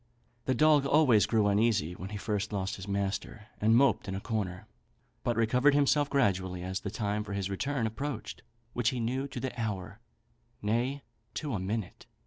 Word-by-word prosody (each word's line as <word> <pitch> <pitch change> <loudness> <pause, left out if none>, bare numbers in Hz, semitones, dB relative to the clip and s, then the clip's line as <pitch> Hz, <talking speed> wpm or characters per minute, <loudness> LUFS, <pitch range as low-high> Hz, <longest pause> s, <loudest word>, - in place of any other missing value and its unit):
The 130 - +1
dog 150 0 +5
always 140 -8 +5
grew 110 -3 +2
uneasy 100 -4 +2
when 90 +2 -7
he 105 - -5
first 105 0 -2
lost 95 -2 -2
his 95 0 -8
master, 100 +2 -3 0.2
and 110 +2 +5
moped 135 -2 +3
in 95 - -3
a - - -2
corner, 100 -4 -3 0.6
but 120 - 0
recovered 125 +5 +4
himself 145 0 +3
gradually 95 -9 +1
as 95 +1 -2
the 100 - -4
time 105 0 -2
for 100 - -6
his 100 -1 -2
return 130 +5 -1
approached; 110 -1 -4 0.3
which 120 -2 +2
he 130 -2 -3
knew 130 +4 -1
to 130 -2 -5
an 130 - -3
hour, 105 -2 -4 0.6
nay, 120 +7 -1 0.3
to 150 -4 -3
a 105 - -1
minute. 100 +1 -4
110 Hz, 180 wpm, -30 LUFS, 100-130 Hz, 0.6 s, dog